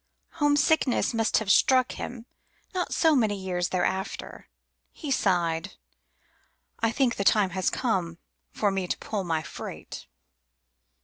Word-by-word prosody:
Homesickness 290 -3 +3
must 225 0 +2
have 210 -3 +1
struck 255 +3 +4
him 240 -1 -7 0.5
not 365 -1 -2
so 320 -2 +3
many 220 -5 +2
years 180 -2 -2
thereafter; 190 +1 -3 0.4
He 295 -4 -6
sighed: 175 -5 +1 1.1
"I 225 -1 +1
think 245 -1 +1
the 200 - 0
time 200 -1 +3
has 185 +1 0
come 180 -9 -1 0.3
for 205 -2 0
me 190 -2 -2
to - - -2
pull 205 -3 -4
my 165 -3 -1
freight." - - -8
205 Hz, 130 wpm, -27 LUFS, 185-250 Hz, 1.1 s, struck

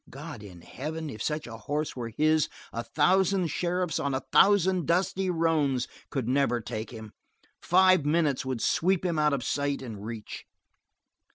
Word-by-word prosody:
God 145 -2 -9
in 90 -5 -12
heaven, 155 - -6
if 110 - -8
such 150 +3 -2
a 115 -1 -8
horse 145 +7 -3
were 120 -2 -4
his 155 +5 +2 0.2
a 115 - -2
thousand 185 +7 +2
sheriffs 180 +1 -1
on 140 -1 -1
a - - 0
thousand 190 -4 +4
dusty 185 +2 +1
roans 155 -7 +1 0.2
could 130 -5 -3
never 130 -2 +2
take 110 0 -5
him; 110 -3 -9 0.5
five 185 -2 +4
minutes 150 -2 +1
would 130 -3 -3
sweep 185 +1 +1
him 170 -3 0
out 150 0 +3
of 140 -3 -1
sight 140 +2 -1
and 110 -5 -7
reach. 110 -1 -7
150 Hz, 165 wpm, -28 LUFS, 120-170 Hz, 0.5 s, thousand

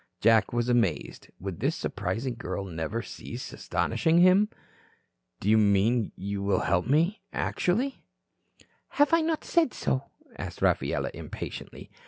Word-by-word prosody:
Jack 115 -1 +4
was 120 0 0
amazed. 115 -10 0
Would 95 -2 -5
this - - 0
surprising 125 +3 -3
girl 100 -3 -4
never 90 +6 -3
cease - - -8
astonishing 165 +1 +1
him? 185 +4 +6 0.9
"Do - - -5
you 110 +1 +6
mean 105 +3 +3
you 100 +1 -4
will 100 0 +1
help 90 +2 +1
me 165 - +2
actually?" 245 +10 -1 1.0
"Have 290 +2 +4
I 330 - +6
not 320 0 -1
said 335 -7 +2
so?" 130 +1 -1 0.3
asked - - -6
Rafaela - - +1
impatiently. - - -8
120 Hz, 135 wpm, -28 LUFS, -, 1.0 s, him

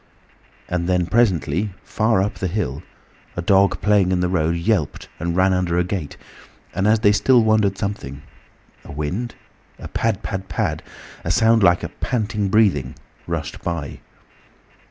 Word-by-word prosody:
And 90 0 -2
then 90 -1 +2
presently, 95 - +1
far 110 -3 +1
up 105 - -2
the 95 - -1
hill, 80 -7 -2 0.6
a - - 0
dog 100 +2 +3
playing 100 -3 +3
in 90 - +1
the 90 - +1
road 85 -2 +1
yelped 85 -2 -1
and 85 0 -2
ran 95 +1 +3
under 90 -2 0
a 90 - +3
gate, 90 -5 -4 0.6
and 95 +3 0
as 110 0 +3
they 105 - +5
still 120 +3 +4
wondered 110 -3 +2
something—a 75 -9 -8
wind—a 85 +12 -7
pad, 110 -3 -1
pad, 95 -1 -5
pad,—a - - -5
sound 115 0 +4
like 90 -2 +4
a - - -3
panting 105 -4 -2
breathing, 95 - +2 0.3
rushed - - -4
by. 85 -5 -4
95 Hz, 145 wpm, -21 LUFS, 85-105 Hz, 0.6 s, they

